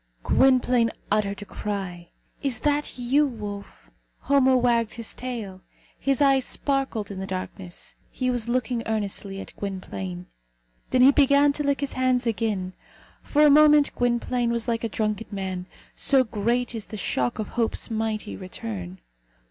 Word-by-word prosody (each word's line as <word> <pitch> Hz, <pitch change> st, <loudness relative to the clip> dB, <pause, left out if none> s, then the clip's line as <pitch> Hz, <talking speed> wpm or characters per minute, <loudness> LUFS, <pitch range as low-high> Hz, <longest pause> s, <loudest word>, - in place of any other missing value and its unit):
Gwynplaine 250 Hz, -3 st, +4 dB, 0.2 s
uttered 205 Hz, -1 st, 0 dB
a -, -, -12 dB
cry. 190 Hz, -5 st, -5 dB, 0.3 s
"Is 260 Hz, -5 st, -1 dB
that 295 Hz, -1 st, 0 dB
you, 270 Hz, +5 st, +2 dB
wolf?" 205 Hz, -, -8 dB, 0.3 s
Homo 265 Hz, -2 st, +4 dB
wagged 235 Hz, -2 st, +2 dB
his 230 Hz, -1 st, -4 dB
tail. 225 Hz, -7 st, -6 dB, 0.4 s
His 275 Hz, +1 st, +2 dB
eyes 270 Hz, -1 st, +4 dB
sparkled 270 Hz, -7 st, -1 dB
in 195 Hz, -, -6 dB
the 190 Hz, -, -4 dB
darkness. 185 Hz, -1 st, -6 dB
He 255 Hz, -1 st, -1 dB
was 240 Hz, -2 st, -1 dB
looking 245 Hz, -1 st, 0 dB
earnestly 200 Hz, -2 st, -2 dB
at -, -, -10 dB
Gwynplaine. 100 Hz, -, -5 dB, 0.6 s
Then 250 Hz, -1 st, +4 dB
he 270 Hz, -, +9 dB
began 280 Hz, 0 st, +4 dB
to 295 Hz, -, -3 dB
lick 280 Hz, -1 st, 0 dB
his 280 Hz, -, -2 dB
hands 255 Hz, -1 st, +1 dB
again. 210 Hz, -5 st, -1 dB, 0.5 s
For 300 Hz, 0 st, +3 dB
a 295 Hz, -, +7 dB
moment 300 Hz, 0 st, +6 dB
Gwynplaine 245 Hz, 0 st, 0 dB
was 235 Hz, 0 st, -1 dB
like 230 Hz, -1 st, -1 dB
a 230 Hz, -, -1 dB
drunken 215 Hz, +1 st, -2 dB
man, 190 Hz, -3 st, -4 dB, 0.3 s
so 270 Hz, -2 st, +4 dB
great 235 Hz, +2 st, -1 dB
is 220 Hz, -2 st, -5 dB
the 215 Hz, -, -7 dB
shock 125 Hz, -10 st, -1 dB
of 215 Hz, -, -4 dB
Hope's 230 Hz, 0 st, -1 dB
mighty 220 Hz, -1 st, -2 dB
return. 100 Hz, -, -7 dB
230 Hz, 155 wpm, -25 LUFS, 200-255 Hz, 0.6 s, he